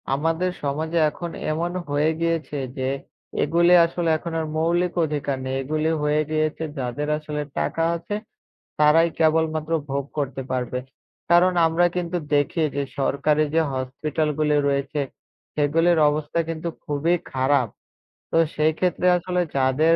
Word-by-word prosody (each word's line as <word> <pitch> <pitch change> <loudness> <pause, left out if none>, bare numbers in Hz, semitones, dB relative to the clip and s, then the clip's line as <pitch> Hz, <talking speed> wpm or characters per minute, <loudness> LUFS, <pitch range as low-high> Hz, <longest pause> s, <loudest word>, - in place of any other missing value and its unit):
আমাদের 165 +5 0
সমাজে 160 +4 -1
এখন 170 +2 -6 0.2
এমন 170 +3 -1 0.2
হয়ে 150 +2 +2
গিয়েছে। 165 -3 -1 0.2
যে 130 0 -1 0.5
এগুলি 170 +3 +4
আসলে 170 0 -1
এখন 170 +1 -6
আর 160 - -2
মৌলিক 175 +2 +1
অধিকার 145 -2 -2
নেই। 130 0 -2
এগুলি 155 +3 -1
হয়ে 150 +1 +2
গিয়েছে 155 +1 0 0.2
যাদের 125 +4 -3
আসলে 150 -1 -4 0.2
টাকা 165 - -1
আছে 170 +5 -4 0.6
তারাই 160 +3 +5
কেবলমাত্র 160 0 +1 0.2
ভোগ 140 0 -1
করতে 135 -2 -2
পারবে। 125 0 -1 0.5
কারণ 180 +1 +5
আমরা 165 +2 +3
কিন্তু 175 0 -1 0.2
দেখি 145 +3 +1
যে 140 - 0 0.2
সরকারি 150 +3 +2
যে 165 - +5
হসপিটালগুলি 150 +3 -1
রয়েছে, 140 +1 0 0.5
সেগুলির 165 +3 +3
অবস্থা 150 +2 -2
কিন্তু 165 +1 -3 0.2
খুবই 150 +4 +1 0.2
খারাপ। 130 -1 +2 0.6
তো - - +2 0.2
সেই 155 +1 +2
ক্ষেত্রে 180 0 +1
আসলে 180 +1 -1 0.2
যাদের 140 +5 +3
155 Hz, 135 wpm, -23 LUFS, 145-165 Hz, 0.6 s, তারাই